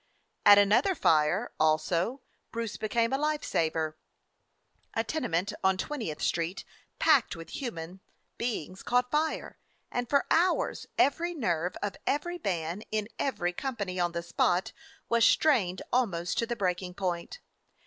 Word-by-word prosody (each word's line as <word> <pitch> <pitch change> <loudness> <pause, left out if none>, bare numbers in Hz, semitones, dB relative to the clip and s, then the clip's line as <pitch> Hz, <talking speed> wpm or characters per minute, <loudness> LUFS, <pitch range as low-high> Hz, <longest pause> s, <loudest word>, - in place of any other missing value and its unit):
At 205 0 +10
another 210 - +4
fire, 150 - +2
also, 170 - +1 0.3
Bruce 230 -2 -3
became 230 +3 0
a 270 - +1
life 300 0 0
saver. 160 -1 -1 1.0
A 225 - +1
tenement 210 - -1
on 190 0 +3
Twentieth 220 - -4
Street 170 +2 -1 0.3
packed - - +4
with 165 -1 -10
human 185 -7 -5 0.4
beings 205 -6 -3
caught 250 0 +1
fire, 310 +1 -1 0.3
and 245 -1 -2
for 280 -1 +3
hours 355 +3 +2
every 340 +5 +2
nerve 175 - -1
of 205 - -3
every 345 +5 -1
man 175 0 -2
in 215 0 -2
every 180 -10 -1
company 200 -6 -3
on 175 -1 +1
the 170 0 -3
spot 175 +1 +1 0.4
was 235 -1 +3
strained 205 - +3
almost 190 -9 +1
to 230 - 0
the 240 - -2
breaking 180 -3 -2
point. 180 - -3
200 Hz, 140 wpm, -29 LUFS, 175-250 Hz, 1.0 s, At